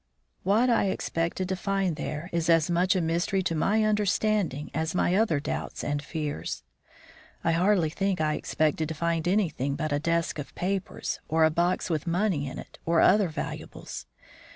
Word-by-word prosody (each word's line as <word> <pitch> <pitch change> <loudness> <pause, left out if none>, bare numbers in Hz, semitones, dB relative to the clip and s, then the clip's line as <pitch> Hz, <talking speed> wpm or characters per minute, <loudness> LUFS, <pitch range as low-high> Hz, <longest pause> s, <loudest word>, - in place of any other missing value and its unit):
What 220 +6 +3
I 235 -4 +3
expected 175 -1 -1
to 190 - 0
find 195 -2 0
there 155 +4 -5
is 170 -1 0
as 165 0 +4
much 180 +3 +3
a 185 - +2
mystery 170 +4 0
to 175 - 0
my 205 +7 +2
understanding 210 -7 +1
as 160 +3 -1
my 180 - +2
other 190 -7 +3
doubts 145 - -4
and 145 0 -1
fears. 150 - -4 0.8
I 165 - +2
hardly 175 -1 +3
think 195 +2 0
I 155 -1 +1
expected 155 +1 0
to 160 - -4
find 165 +1 0
anything 165 -8 +1
but 155 +1 -2
a 145 - +1
desk 165 0 0
of 145 - -7
papers, 190 +1 -2
or 160 +1 +3
a 160 - +5
box 175 +3 +1
with 155 0 -1
money 170 -4 +1
in 130 - -6
it - - -10
or 165 0 +2
other 205 0 +5
valuables. 155 - -6
170 Hz, 175 wpm, -27 LUFS, 155-195 Hz, 0.8 s, a